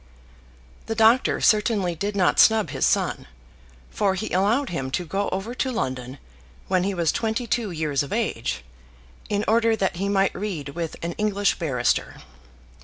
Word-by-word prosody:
The 225 - -2
doctor 225 +3 +4
certainly 210 -4 +2
did 200 +5 -3
not 185 -3 +2
snub 220 -2 +5
his - - +1
son, - - 0 0.6
for 195 -2 +1
he 215 +3 -4
allowed 215 +8 +1
him 135 -6 -3
to 175 +6 -2
go 195 +5 -2
over 195 +6 -4
to 260 +1 -1
London 130 - -3 0.5
when 185 -1 +1
he 195 0 -1
was 170 -3 +1
twenty 225 +2 -2
two 235 -2 -1
years 155 -5 -1
of 140 - -6
age, 210 - -2 0.7
in 205 0 0
order 225 0 +3
that 190 -4 -1
he 200 +2 -1
might 195 -1 +2
read 180 -8 -4
with 165 +2 -4
an 170 - -2
English 205 -1 +1
barrister. 135 -8 0
195 Hz, 165 wpm, -24 LUFS, 170-220 Hz, 0.7 s, snub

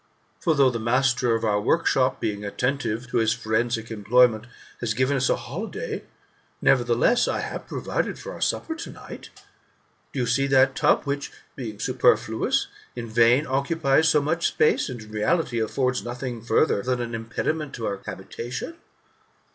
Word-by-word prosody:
For, 165 -4 +1
though 135 -3 +5
the 115 - -3
master 125 0 +2
of 115 - -3
our 105 -1 +1
workshop, - - +2
being 105 -1 -3
atten 125 +7 -1
tive 115 -2 -3
to - - 0
his 110 -1 +3
forensic 115 0 -1
employment, 110 +1 +3 0.3
has 110 -2 -1
given 130 +3 +1
us 130 -1 +1
a' - - +3
holiday, - - -5 0.5
nevertheless, 120 - +3
I - - -1
have - - -6
provided - - -2
for - - -8
our - - -10
supper 325 - -1
to 325 - -7
night. - - -10 0.8
Do 140 - -4
you' - - +1
see 135 +4 +1
that 135 0 +4
tub - - +3
which, 140 0 -3 0.2
being 110 -6 -6
superfluous, - - +2 0.3
in 120 -1 -5
vain 120 +5 +4
occupies 140 +2 +2
so 150 -2 +3
much 165 +3 +1
space, 155 -1 +2
and, 125 -2 -6
in 110 - -14
reality, 120 +4 0
affords 125 +3 0
nothing 120 -1 -5
farther 115 -1 +2
than 125 +3 -1
an 120 -1 -4
impediment 135 +7 -3
to 115 - -5
our 100 -1 -3
habitation 120 - -6
125 Hz, 165 wpm, -24 LUFS, 115-135 Hz, 0.8 s, though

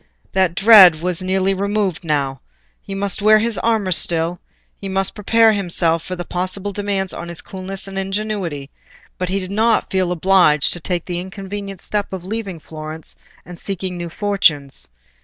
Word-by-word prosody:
That 185 -3 +2
dread 195 -6 +8
was 180 +1 -2
nearly 190 +1 +1
removed 200 -2 -1
now: 140 -4 -1 0.4
he 195 - -7
must 200 0 -2
wear 215 +1 +6
his 225 0 0
armour 220 -5 0
still, 170 0 +1 0.4
he 195 - -7
must 190 0 -1
prepare 225 +2 +4
himself 170 -4 +1
for 185 - -5
possible 185 +3 -3
demands 200 -2 -1
on 170 - -6
his 170 -1 -4
coolness 190 +1 -6
and 195 0 -4
ingenuity, 195 -8 -3 0.5
but 180 0 -2
he 195 +1 0
did 185 0 -6
not 220 +2 +1
feel 185 -2 +1
obliged 175 -4 +3
to 175 - -5
take 175 0 -2
the 175 -1 -3
inconvenient 195 0 -6
step 205 -1 -2
of 185 -2 -6
leaving 200 -4 -4
Florence 155 0 -8 0.3
and 175 0 -10
seeking 190 -2 -4
new 175 -1 -5
fortunes. 165 -8 +1
190 Hz, 165 wpm, -19 LUFS, 170-200 Hz, 0.5 s, dread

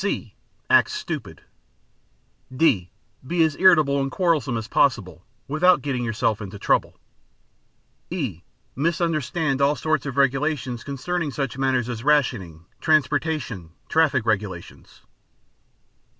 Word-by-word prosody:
(c) 190 - -3 0.3
Act - - +5
stupid. - - -6 1.1
(d) 125 - +2 0.4
Be 170 +1 +2
as 155 -2 +1
irritable 155 -7 +5
and 135 - -1
quarrelsome 150 -8 +1
as 110 -1 -5
possible 105 - +1 0.2
without 170 +5 +3
getting 130 -4 -2
yourself 110 -2 -1
into 100 0 -7
trouble. - - 0 1.1
(e) 135 - -4 0.3
Misunderstand 155 -2 0
all 140 +2 +3
sorts 155 -3 -1
of 135 0 -5
regulations 135 -2 0
concerning 150 +4 -3
such 135 -3 -3
matters 130 -3 0
as 120 -2 -5
rationing, 120 - 0
transportation, 145 - 0 0.2
traffic 145 -7 +2
regulations. 100 -6 -4
135 Hz, 110 wpm, -23 LUFS, 115-155 Hz, 1.1 s, Act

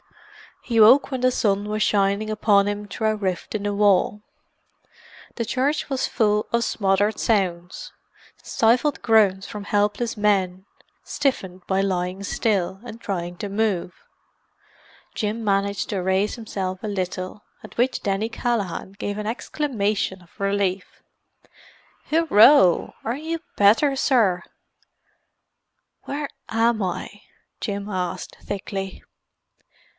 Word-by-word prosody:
He 230 -3 0
woke 240 +6 +7
when 260 -2 -2
the 255 0 +3
sun 205 -3 0
was 215 0 -2
shining 200 +1 +1
upon 205 -2 +3
him 205 0 -3
through 220 +3 -1
a 215 - 0
rift 190 -4 -3
in 205 - -2
the 205 0 -1
wall. 205 0 +2 1.1
The 230 - -2
church 270 +7 -1
was 265 -2 0
full 210 -1 +1
of 235 0 +2
smothered 205 0 +1
sounds—stifled 220 - -1
groans 200 -4 +3
from 205 -1 -7
helpless 210 +3 0
men, 190 -3 +1 0.4
stiffened 190 -11 -2
by 190 0 +1
lying 185 0 -2
still, 195 -3 -1
and 230 -2 -9
trying 175 -4 -4
to 205 - -5
move. 200 -4 -1 1.2
Jim 215 +2 -2
managed 200 0 0
to 195 -3 -1
raise 190 +3 +1
himself 195 -5 -5
a - - -2
little, 185 0 -4 0.2
at - - -13
which 245 +1 +1
Denny 200 +3 -1
Callaghan 220 -5 -2
gave 205 0 -4
an 210 0 -4
exclamation 215 -6 -2
of 170 - -25
relief. 195 -2 -1 1.1
"Hurroo! 280 - +5
Are 235 +4 -2
you 325 +2 -4 0.2
better, 230 +8 +4
sir?" 225 -10 +2 1.6
"Where 290 +1 -4 0.2
am 225 0 +2
I?" 190 +2 -4 0.4
Jim 200 -2 -4
asked 180 -3 -4
thickly. 195 -1 -5
205 Hz, 120 wpm, -23 LUFS, 195-225 Hz, 1.6 s, woke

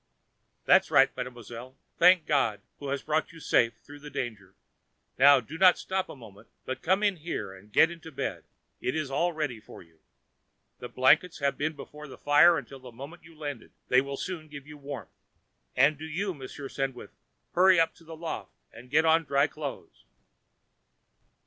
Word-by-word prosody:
"That - - +7
is - - -17
right, - - +4
Mademoiselle. 125 +1 -8 0.2
Thank 180 -1 +6
God 115 -9 +1 0.2
who 145 - -6
has 140 0 -3
brought 155 +1 -1
you 165 - -13
safe 115 -6 +2
through 145 0 -12
the 150 +1 -10
danger. 105 -9 -6 0.6
Now, 140 +1 +8
do 145 +8 -9
not 185 -1 +7
stop 190 0 -3
a - - -8
moment, 110 -6 -15 0.2
but 130 - -5
come 190 +4 +1
in 200 -3 +2
here 155 - -5
and 100 +2 -16
get 160 +10 +5
into 165 -1 -10
bed, 135 - -4 0.4
it 125 - -2
is 155 -4 -3
all 170 +6 +1
ready 150 -8 -3
for 105 - -13
you. 80 -1 -27 0.8
The 125 - -7
blankets 145 +7 +3
have 140 -2 0
been 160 +2 -2
before 150 +1 -10
the 135 - -11
fire 155 +4 +5
until 135 0 -8
the 130 -1 -12
moment 140 +9 -10
you 165 -1 -16
landed; 145 -6 -7 0.2
they 125 +1 +5
will 140 0 -6
soon 165 -2 -5
give 145 -2 -10
you 150 0 -11
warmth. 140 - -8 0.6
And 140 +3 +4
do 160 - -6
you, 185 +5 -3
Monsieur 140 -1 -8
Sandwith, 135 -2 -4 0.4
hurry 185 0 +5
up 165 - +2
to 170 - -20
the 165 0 -10
loft 165 0 -5 0.2
and 125 +2 -13
get 160 +4 +3
on 165 +1 +4
dry 140 0 +3
clothes." 145 -2 -8
145 Hz, 185 wpm, -28 LUFS, 130-160 Hz, 0.8 s, Now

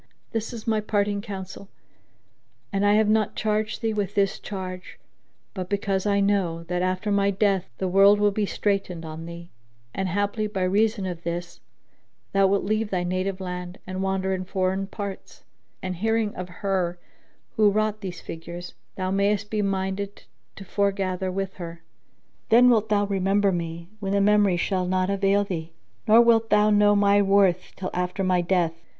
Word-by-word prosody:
This 225 0 -3
is 230 -3 -8
my 220 -1 +1
parting 205 -1 0
counsel; 195 -2 -8 1.0
and 195 0 +1
I 205 0 +4
have 215 0 +3
not 215 -1 +2
charged 215 +1 -1
thee 225 -1 +1
with 205 -1 -2
this 195 -1 +1
charge, 185 -2 -7 0.6
but 185 -3 -5
because 200 -1 -1
I 200 0 +2
know[FN#6] 180 -5 0
that 180 0 0
after 185 +3 -1
my 200 0 +3
death 195 -2 +1
the 190 - -1
world 195 +2 +6
will 205 0 +3
be 205 0 -1
straitened 190 -6 -1
on 160 +1 -7
thee 170 +1 -9 0.4
and, 190 -1 -2
haply, 205 +3 -1
by 195 -3 -2
reason 205 +2 +1
of 175 -2 -5
this, 170 +1 -5 0.7
thou 195 0 +4
wilt 200 +1 +1
leave 215 +1 0
thy 180 -3 -1
native 185 +2 -2
land 180 -1 -6
and 185 0 -4
wander 190 0 0
in 185 0 -2
foreign 190 +1 -1
parts, 200 -1 -7 0.4
and 185 -1 -3
hearing 220 +1 0
of 180 0 -6 0.2
her 180 -3 0 0.6
who 215 -1 +5
wrought 215 0 0
these 185 -3 -6
figures, 170 +2 -8 0.2
thou 185 -1 -2
mayest 200 +1 +1
be 215 -1 0
minded 195 0 -2 0.3
to 195 - -10
fore 200 +2 +1
gather 185 -1 -2
with 195 +1 -4
her. 170 -2 -8 0.7
Then 245 +2 +7
wilt 220 -2 +2
thou 205 -1 +2
remember 195 0 +2
me, 170 -1 -4
when 195 -1 -2
the 200 - +3
memory 205 -2 +4
shall 185 +1 0
not 185 +1 +1
avail 200 +1 +2
thee; 165 -4 -5 0.3
nor 220 +2 +8
wilt 230 -1 +4
thou 210 0 +4
know 205 0 +5
my 200 0 +4
worth 195 -2 +2
till 185 -1 -5
after 180 +2 -2
my 185 -1 +2
death. 175 -2 +1
195 Hz, 175 wpm, -25 LUFS, 185-205 Hz, 1.0 s, nor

